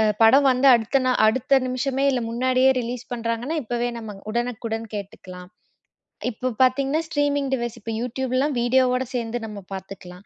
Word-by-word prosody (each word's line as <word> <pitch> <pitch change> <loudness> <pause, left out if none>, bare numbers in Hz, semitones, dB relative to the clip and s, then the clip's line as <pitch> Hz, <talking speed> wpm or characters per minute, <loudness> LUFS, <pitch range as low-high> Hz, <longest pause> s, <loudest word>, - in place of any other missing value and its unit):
அ 220 - +4 0.2
படம் 270 +5 +6
வந்த 255 +2 +2
அடுத்த 235 +4 +1
நா 255 - +3
அடுத்த 260 +4 +3
நிமிஷமே 265 +2 -1
இல்ல 250 -2 -1
முன்னாடியே 255 +2 +3
ரிலீஸ் 240 0 -5
பண்றாங்கன்னா 230 +6 -3
இப்பவே 240 +1 -2
நம்ம 215 -3 -8 0.2
உடனுக்குடன் 230 -1 -3
கேட்டுக்கலாம். 185 -3 -8 0.8
இப்ப 250 +2 -3
பாத்தீங்கன்னா 275 +5 +1
ஸ்ட்ரீமிங் 285 -3 0
டிவைஸ், 235 -1 -4
இப்ப 225 - -5
YouTubeலாம் 260 +3 -1
வீடியோ 255 +2 +3
ஓட 255 - 0
சேர்ந்து 235 0 -2
நம்ம 210 -2 -8
பாத்துக்கலாம். 190 -1 -9
245 Hz, 150 wpm, -23 LUFS, 225-265 Hz, 0.8 s, படம்